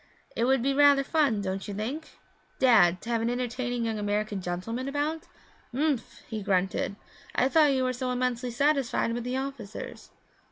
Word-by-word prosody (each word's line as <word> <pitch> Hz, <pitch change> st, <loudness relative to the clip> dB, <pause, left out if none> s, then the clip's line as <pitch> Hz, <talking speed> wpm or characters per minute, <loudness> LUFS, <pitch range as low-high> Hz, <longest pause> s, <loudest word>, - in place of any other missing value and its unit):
It 230 Hz, -, +1 dB
would 260 Hz, -1 st, +3 dB
be 275 Hz, +1 st, +2 dB
rather 285 Hz, 0 st, +6 dB
fun, 275 Hz, -9 st, +1 dB
don't 190 Hz, 0 st, -3 dB
you 205 Hz, -, -5 dB
think, 260 Hz, +10 st, -5 dB, 0.4 s
Dad, 195 Hz, -9 st, +5 dB
to 230 Hz, -, -7 dB
have 230 Hz, -1 st, +1 dB
an 230 Hz, -, 0 dB
entertaining 245 Hz, 0 st, -2 dB
young 220 Hz, -1 st, -2 dB
American 205 Hz, -1 st, -1 dB
gentleman 185 Hz, +9 st, -3 dB
about?' 300 Hz, +4 st, -2 dB, 0.5 s
'Ump!' 285 Hz, -3 st, +2 dB, 0.3 s
he 220 Hz, -2 st, -4 dB
grunted. 195 Hz, 0 st, 0 dB, 0.4 s
'I 255 Hz, -, +3 dB
thought 300 Hz, -1 st, +5 dB
you 260 Hz, -1 st, +1 dB
were 255 Hz, 0 st, 0 dB
so 255 Hz, +1 st, -3 dB
immensely 250 Hz, 0 st, -1 dB
satisfied 270 Hz, -2 st, +1 dB
with 240 Hz, 0 st, -3 dB
the 250 Hz, +2 st, -2 dB
officers.' 265 Hz, -6 st, -6 dB
245 Hz, 170 wpm, -28 LUFS, 215-275 Hz, 0.5 s, rather